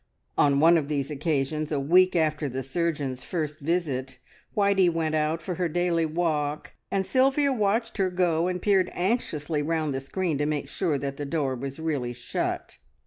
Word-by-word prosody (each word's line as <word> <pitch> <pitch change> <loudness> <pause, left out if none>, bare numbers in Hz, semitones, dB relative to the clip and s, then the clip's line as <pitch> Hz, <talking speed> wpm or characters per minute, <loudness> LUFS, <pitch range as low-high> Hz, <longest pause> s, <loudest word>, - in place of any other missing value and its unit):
On 140 -1 +4
one 165 +2 +6
of 145 - -4
these 145 -1 -2
occasions, 150 0 -1
a 145 - +1
week 180 +7 +4
after 155 -3 +1
the 130 +1 -4
surgeon's 140 -2 -2
first 155 -4 -3
visit, 145 -5 -2 0.4
Whitey 200 -3 +4
went 160 -1 -1
out 155 +1 0
for, 180 - -3
her 175 -1 -1
daily 170 0 +1
walk, 155 -2 -1 0.2
and 195 -1 0
Sylvia 270 +3 +3
watched 225 0 0
her 190 -2 +2
go 175 -2 +1
and 180 0 -1
peered 190 -1 +2
anxiously 165 -7 -1
round 155 -1 -1
the 135 - -2
screen 160 +1 -2
to 145 - +1
make 150 -2 -2
sure 165 -6 -1
that 140 0 -4
the 145 - -4
door 140 -3 0
was 135 +3 -6
really 145 -7 -2
shut. 120 - -4
160 Hz, 180 wpm, -26 LUFS, 145-180 Hz, 0.4 s, one